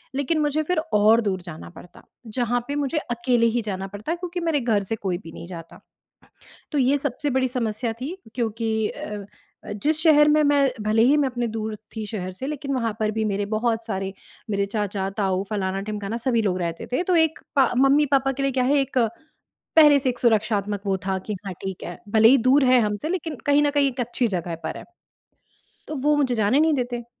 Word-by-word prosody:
लेकिन 295 +3 0
मुझे 300 +1 +1
फिर 360 +2 -1 0.2
और 215 +3 +5
दूर 190 -4 -2
जाना 170 -2 -9
पड़ता, 175 0 -15 0.2
जहाँ 240 +2 0
पे 285 - -3
मुझे 290 +2 -1
अकेले 235 0 +2
ही 240 - +2
जाना 195 -2 -4
पड़ता, 210 - -4
क्योंकि 355 0 -5
मेरे 325 -4 +1
घर 220 -5 +1
से 225 +4 -3
कोई 190 -4 -2
भी 165 -4 -11
नहीं 170 - -9
जाता। 165 -2 -10 0.9
तो 295 - 0
ये 270 +2 +3
सबसे 285 +1 -2
बड़ी 260 0 +1
समस्या 230 -1 -2
थी, 305 +9 -4 0.2
क्योंकि 225 -2 -1
अ 210 -1 -6 0.4
अ, - - -5
जिस 300 +10 0
शहर 300 -2 +6
में 305 0 +4
मैं 285 -2 +3
भले 220 +1 +3
ही 275 +5 +5
मैं 285 -3 +2
अपने 240 -1 -2
दूर 220 -1 -4 0.2
थी 215 - -3
शहर 185 -4 -5
से, 260 +8 -6
लेकिन 280 -2 -3
वहाँ 230 -4 0
पर 215 -1 +1
भी 220 0 -2
मेरे 205 -1 -1
बहुत 225 +1 0
सारे 195 -3 -3 0.4
मेरे 200 -1 0
चाचा, 200 -2 -2
ताऊ, 195 -2 -1
फलाना-ढिमकाना, 200 +2 -3
सभी 235 -1 +1
लोग 185 -3 0
रहते 170 -1 -4
थे। 300 - +1
तो 365 -1 +1
एक 320 -1 +2 0.2
पा 265 -2 +5
मम्मी-पापा 275 0 +3
के 275 +1 -4
लिए 275 -1 +1
क्या 255 -1 +1
है 285 +3 +3
एक, 265 -1 -1 0.8
पहले 295 -2 +8
से 265 -1 0
एक 245 - -7
सुरक्षात्मक 210 -3 +1
वो 195 -1 +1
था 190 0 0
कि, 205 +2 -5
"हाँ, 190 - -3
ठीक 190 -2 -5
है। 175 - -7
भले 220 +1 +6
ही 270 +3 +6
दूर 275 +1 +5
है 250 -1 +5
हम 210 -1 0
से, 310 - -5
लेकिन 335 -5 -3
कहीं 290 +1 +4
न 290 - +3
कहीं 285 -1 +2
एक 255 - -6
अच्छी 240 0 0
जगह 170 -1 -4
पर - - -3
है।" - - -10 1.0
तो 310 - -5
वो 295 +2 +2
मुझे 260 -4 +1
जाने 220 +6 +2
नहीं 315 0 +4
देते। 245 -3 -2
235 Hz, 215 wpm, -23 LUFS, 205-280 Hz, 1.0 s, पहले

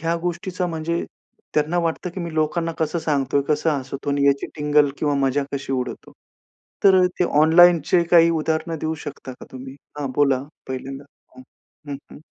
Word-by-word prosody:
ह्या 165 +1 0
गोष्टीचा 180 +1 -2
म्हणजे 170 0 -2 0.5
त्यांना 155 +4 +1
वाटतं 170 +1 -2
की 185 - -7
मी 170 -1 -5
लोकांना 165 +2 0
कसं 160 +2 -1
सांगतोय 140 -3 0
कसं 150 +2 +1
हसवतो? 140 0 -3
आणि 140 0 +2
याची 140 0 +2
टिंगल 150 -1 +3
किंवा 145 -2 +1
मजा 140 0 +1
कशी 135 -1 -3
उडवतो? 125 -1 -4 0.7
तर 190 -1 +7
अ, 180 - +5
ते 180 - +3 0.2
ऑनलाईनचे 170 +1 +5
काही 170 -1 +6
उदाहरण 160 0 -1
देऊ 160 +1 -2
शकता 135 -2 -7
का - - -12
तुम्ही? 130 +1 -9 0.2
हां, 140 -3 -3
बोला. 135 -3 +3 0.3
पहिल्यांदा 135 +2 -6 0.3
हं, 130 - -11 0.5
हं. 140 - -3 0.2
हं. - - -11
150 Hz, 170 wpm, -22 LUFS, 140-170 Hz, 0.7 s, तर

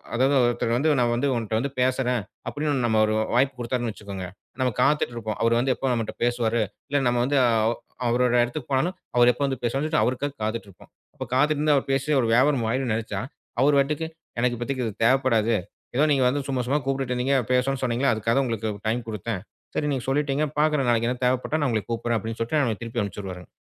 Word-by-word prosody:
அதாவது 135 +4 +3
ஒருத்தர் 120 -1 +1
வந்து 150 +3 +3
நான் 120 -1 +2
வந்து 140 +4 0
உன்ட்ட 110 -1 -1
வந்து 140 +3 -2
பேசுறேன் 125 -2 +1 0.3
அப்படின்னு 145 -4 -1
நம்ம 110 -2 +3
ஒரு 110 - 0 0.2
வாய்ப்பு 130 +2 +3
கொடுத்தார்னு 120 -1 -2
வச்சுக்கோங்க. 100 -3 -7 0.3
நாம 125 -2 +1
காத்துட்டு 150 -5 +2
இருப்போம். 110 -2 -4
அவர் 115 0 +3
வந்து 130 +2 +2
எப்போ 135 - -4
நம்மட்ட 115 -2 -2
பேசுவாரு 120 -2 +1 0.3
இல்ல 145 0 +1
நம்ம 120 0 +2
வந்து 140 +2 +1
அ 120 - +4 0.6
அவரோட 125 +1 +2
இடத்துக்குப் 125 +3 -4
போனாலும் 175 +8 +1 0.2
அவர் 120 0 +6
எப்போ 125 - -6
வந்து 135 -3 -2
பேசுவாரு 135 +5 0
சொல்ட்டு 155 -1 +1
அவருக்காகக் 140 +3 -2
காத்துட்டு 110 -1 -3
இருப்போம். 95 - -17 0.2
அப்பக் - - -8
காத்துட்டு 150 +2 +2
இருந்தா 150 -1 +3
அவர் 135 - -1
பேசிய 140 +3 +1
ஒரு 115 - 0
வியாபாரோ 130 0 +3
ஆயிடும்னு 130 -2 0
நினைச்சா 105 -3 -3 0.4
அவர் 140 +1 +4
வட்டுக்கு 150 +3 -1 0.3
எனக்கு 120 0 +1
இப்பதைக்கு 130 0 -2
இது 110 - -3
தேவைப்படாது. 115 -3 +3 0.4
எதோ 145 +5 +4
நீங்க 135 -2 +2
வந்து 140 +2 0
சும்மா 130 -2 0
சும்மா 145 +2 +2
கூப்பிட்டுட்டு 135 -2 -1
இருக்கீங்க. 135 +3 +1 0.2
பேசணும்னு 130 +1 +1
சொன்னீங்களே. 125 +2 +1
அதுக்காக 110 +2 0
தான் 135 - +3
உங்களுக்கு 110 -2 -2 0.2
டைம் 115 +1 -1
கொடுத்தேன். 105 -2 -3 0.3
சரி 150 - 0
நீங்கச் 130 -1 -4
சொல்லிட்டீங்க. 145 +1 +1
பாக்குறேன். 150 -4 +2
நாளைக்கு 120 +2 0
தேவைப்பட்டா 130 +5 0
நான் 145 - +1
உங்களைக் 110 -1 -2
கூப்பிடுறேன் 115 0 0
அப்படின்னு 110 +2 -5
சொல்லிட்டு 145 +7 +1
நம்மள 115 -5 -1
திருப்பி 115 0 -3
அனுப்பிச்சுருவாருங்க. 95 -2 -6
125 Hz, 205 wpm, -25 LUFS, 115-135 Hz, 0.6 s, அவர்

